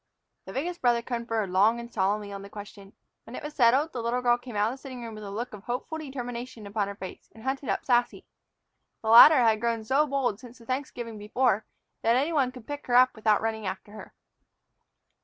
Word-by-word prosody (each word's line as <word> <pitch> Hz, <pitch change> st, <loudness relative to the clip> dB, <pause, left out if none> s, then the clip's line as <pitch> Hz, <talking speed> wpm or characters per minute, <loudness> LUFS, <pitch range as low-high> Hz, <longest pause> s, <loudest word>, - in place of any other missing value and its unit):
The -, -, -7 dB
biggest 345 Hz, +6 st, -3 dB
brother 240 Hz, -1 st, +2 dB
conferred 230 Hz, -5 st, -2 dB
long 210 Hz, +5 st, +3 dB
and 235 Hz, 0 st, -9 dB
solemnly 205 Hz, +1 st, 0 dB
on 200 Hz, -, -6 dB
the 200 Hz, -, -10 dB
question. 200 Hz, -1 st, -11 dB, 0.3 s
When 235 Hz, -, -9 dB
it -, -, -7 dB
was 300 Hz, 0 st, -6 dB
settled, 270 Hz, +4 st, +3 dB
the 245 Hz, -, -3 dB
little 240 Hz, +2 st, -1 dB
girl 240 Hz, 0 st, +3 dB
came 245 Hz, -2 st, -10 dB
out 210 Hz, +2 st, +2 dB
of 270 Hz, -, -11 dB
the -, -, -24 dB
sitting 255 Hz, -3 st, -8 dB
room 230 Hz, -1 st, -7 dB
with 215 Hz, 0 st, -9 dB
a 200 Hz, -, -6 dB
look 230 Hz, +5 st, -5 dB
of 205 Hz, -1 st, -10 dB
hopeful 250 Hz, +6 st, -4 dB
determination 245 Hz, -5 st, -6 dB
upon 200 Hz, 0 st, -2 dB
her 200 Hz, -, -6 dB
face 190 Hz, -2 st, -9 dB
and 220 Hz, -, -13 dB
hunted 270 Hz, +1 st, -3 dB
up -, -, -1 dB
Sassy. 245 Hz, -1 st, +1 dB, 0.8 s
The 220 Hz, -, -1 dB
latter 255 Hz, +4 st, +9 dB
had 220 Hz, -2 st, +3 dB
grown 230 Hz, -1 st, -1 dB
so 275 Hz, +7 st, +2 dB
bold 260 Hz, -7 st, -1 dB
since 245 Hz, -1 st, -13 dB
the 230 Hz, -, -17 dB
Thanksgiving 240 Hz, -4 st, -4 dB
before 215 Hz, 0 st, 0 dB, 0.3 s
that 230 Hz, +1 st, +3 dB
any 285 Hz, +6 st, +1 dB
one 270 Hz, -5 st, +2 dB
could 250 Hz, -3 st, -12 dB
pick 290 Hz, 0 st, -7 dB
her 245 Hz, -, +1 dB
up 255 Hz, +1 st, +6 dB
without 215 Hz, -1 st, +2 dB
running 220 Hz, -2 st, -2 dB
after 200 Hz, +2 st, -6 dB
her. 215 Hz, -, -11 dB
235 Hz, 225 wpm, -27 LUFS, 215-255 Hz, 0.8 s, latter